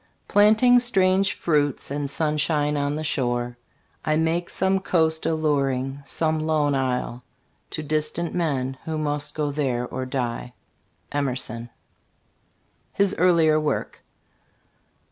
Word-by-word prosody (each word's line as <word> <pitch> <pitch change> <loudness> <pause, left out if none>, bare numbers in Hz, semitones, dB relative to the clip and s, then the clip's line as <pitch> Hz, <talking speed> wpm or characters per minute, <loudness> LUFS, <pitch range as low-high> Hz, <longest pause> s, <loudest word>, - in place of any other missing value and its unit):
Planting 220 +4 +5
strange 195 -5 +3
fruits 145 -5 0
and 145 0 -2
sunshine 150 0 +1
on 145 0 -1
the 155 - -3
shore, 120 -4 -1 0.4
I 155 - +1
make 165 +2 0
some 190 +1 +1
coast 160 -4 +1
alluring, 140 -4 0
some 155 +2 +1
lone 155 -2 +1
isle, 125 -2 -2 0.5
To 155 - -4
distant 155 +3 -1
men, 135 -6 -1
who 160 -1 -3
must 145 -1 -2
go 150 -2 -1
there 130 -4 -1
or 130 +1 -5
die. 125 -2 -3 0.6
Emerson. 125 -4 -3 1.2
HIS 200 0 +2
EARLIER 165 -3 +4
WORK. 150 -2 -3
150 Hz, 115 wpm, -24 LUFS, 135-160 Hz, 1.2 s, Planting